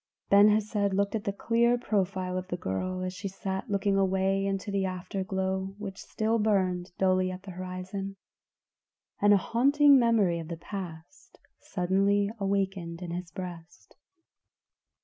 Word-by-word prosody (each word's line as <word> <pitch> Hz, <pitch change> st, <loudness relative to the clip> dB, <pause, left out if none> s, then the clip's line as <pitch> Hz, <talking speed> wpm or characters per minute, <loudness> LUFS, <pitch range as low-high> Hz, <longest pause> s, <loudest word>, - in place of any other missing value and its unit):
Ben 200 Hz, +1 st, +8 dB
Hesed 210 Hz, -2 st, +1 dB
looked 200 Hz, 0 st, +1 dB
at 220 Hz, -1 st, -3 dB
the 200 Hz, -, 0 dB
clear 235 Hz, +4 st, +2 dB
profile 190 Hz, -5 st, -1 dB
of 185 Hz, 0 st, -3 dB
the 175 Hz, -, -3 dB
girl 185 Hz, -, -3 dB
as 185 Hz, 0 st, -3 dB
she 190 Hz, +2 st, -5 dB
sat 190 Hz, 0 st, -4 dB
looking 200 Hz, 0 st, +1 dB
away 195 Hz, 0 st, +1 dB
into 195 Hz, +1 st, -2 dB
the 200 Hz, -1 st, 0 dB
afterglow 190 Hz, +1 st, -3 dB
which 200 Hz, -2 st, -7 dB
still 225 Hz, +1 st, -1 dB
burned 185 Hz, -4 st, +1 dB
dully 185 Hz, -1 st, +2 dB
at 185 Hz, +1 st, -7 dB
the 195 Hz, -, -8 dB
horizon, 185 Hz, +2 st, -5 dB, 1.1 s
and 205 Hz, 0 st, +5 dB
a 205 Hz, -, +7 dB
haunting 280 Hz, +7 st, +5 dB
memory 215 Hz, -8 st, +3 dB
of 165 Hz, -, -7 dB
the 170 Hz, 0 st, -5 dB
past 175 Hz, -, -9 dB, 0.2 s
suddenly 200 Hz, +2 st, +1 dB
awakened 195 Hz, -3 st, -2 dB
in 175 Hz, -, -5 dB
his 175 Hz, 0 st, -5 dB
breast. 175 Hz, -2 st, -9 dB
195 Hz, 150 wpm, -28 LUFS, 185-200 Hz, 1.1 s, Ben